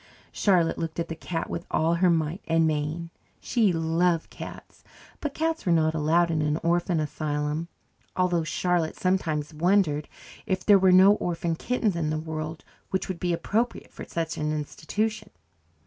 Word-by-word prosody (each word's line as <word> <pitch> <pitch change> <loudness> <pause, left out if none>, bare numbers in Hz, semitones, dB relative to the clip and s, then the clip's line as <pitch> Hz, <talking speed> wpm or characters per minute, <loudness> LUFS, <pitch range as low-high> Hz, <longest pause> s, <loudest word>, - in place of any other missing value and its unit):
Charlotte 180 -5 +2
looked 165 0 -4
at 170 - -2
the 165 - -4
cat 165 +1 -4
with 170 - -4
all 160 +2 +2
her 180 +1 +3
might 165 +2 0
and 165 0 +3
main. 155 +2 -2 0.3
She 225 -6 +2
loved 165 +1 +1
cats, - - -10 0.4
but 295 -2 -4
cats 325 0 -1
were 180 - +1
not 160 -1 +3
allowed 165 +2 +2
in 160 -1 0
an 150 0 +1
orphan 170 0 +1
asylum, 150 +1 -2 0.5
although 175 -2 +1
Charlotte 170 0 0
sometimes 165 -5 -1
wondered 160 -2 +2 0.4
if 185 -2 -1
there 205 -2 +7
were 190 0 +5
no 190 +2 +8
orphan 170 -1 -2
kittens 225 0 0
in 160 -3 -1
the 155 - -1
world 155 0 -5 0.3
which 190 - -1
would 185 -3 -4
be 180 - 0
appropriate 215 +8 -1
for - - -9
such 165 -1 -3
an 150 0 -1
institution. 210 +8 -3
170 Hz, 165 wpm, -26 LUFS, 155-185 Hz, 0.5 s, no